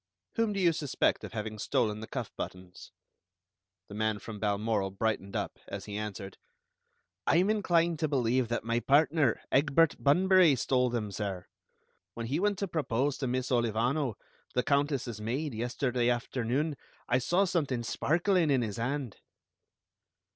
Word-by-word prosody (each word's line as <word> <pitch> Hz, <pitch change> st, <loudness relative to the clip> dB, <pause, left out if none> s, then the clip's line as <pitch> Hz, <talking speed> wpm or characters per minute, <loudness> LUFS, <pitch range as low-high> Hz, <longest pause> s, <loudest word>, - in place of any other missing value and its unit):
"Whom 225 Hz, -2 st, +1 dB
do 200 Hz, -, -2 dB
you 175 Hz, -3 st, +4 dB
suspect 145 Hz, -4 st, 0 dB
of -, -, -8 dB
having 110 Hz, -1 st, -4 dB
stolen 105 Hz, +1 st, 0 dB
the 110 Hz, -, -7 dB
cuff -, -, -5 dB
buttons?" 90 Hz, -1 st, -8 dB, 1.0 s
The -, -, -11 dB
man 110 Hz, 0 st, 0 dB
from 105 Hz, +1 st, -8 dB
Balmoral 105 Hz, -1 st, 0 dB
brightened 100 Hz, 0 st, -2 dB
up, -, -, -3 dB
as 100 Hz, -1 st, -6 dB
he 105 Hz, -, -6 dB
answered: 105 Hz, -2 st, -6 dB, 0.9 s
"I -, -, +4 dB
am 190 Hz, +4 st, +3 dB
inclined 170 Hz, -6 st, +2 dB
to 155 Hz, -, +1 dB
believe 130 Hz, -3 st, +1 dB
that 120 Hz, -, -2 dB
my 115 Hz, +1 st, 0 dB
partner, 145 Hz, -1 st, +3 dB
Egbert 150 Hz, +3 st, +4 dB
Bunbury, 180 Hz, +1 st, +5 dB
stole 125 Hz, 0 st, +1 dB
them, 115 Hz, -4 st, -2 dB
sir. 95 Hz, -3 st, -4 dB, 0.7 s
When 115 Hz, -, -4 dB
he 140 Hz, +7 st, -1 dB
went 205 Hz, +1 st, +1 dB
to 200 Hz, -, -2 dB
propose 145 Hz, -4 st, -1 dB
to 135 Hz, -, -1 dB
Miss 130 Hz, +1 st, -2 dB
Olivano, 120 Hz, +2 st, +1 dB, 0.4 s
the 125 Hz, -, +2 dB
Countess's 140 Hz, -6 st, 0 dB
maid, 130 Hz, +6 st, -2 dB
yesterday 120 Hz, +1 st, 0 dB
afternoon, 125 Hz, +4 st, -1 dB, 0.3 s
I 125 Hz, -, +3 dB
saw 175 Hz, +10 st, +2 dB
something 145 Hz, -10 st, -1 dB
sparkling 170 Hz, -, +1 dB
in 130 Hz, -3 st, +3 dB
his 105 Hz, -3 st, -4 dB
hand." 125 Hz, -1 st, -3 dB
125 Hz, 155 wpm, -30 LUFS, 110-155 Hz, 1.0 s, Bunbury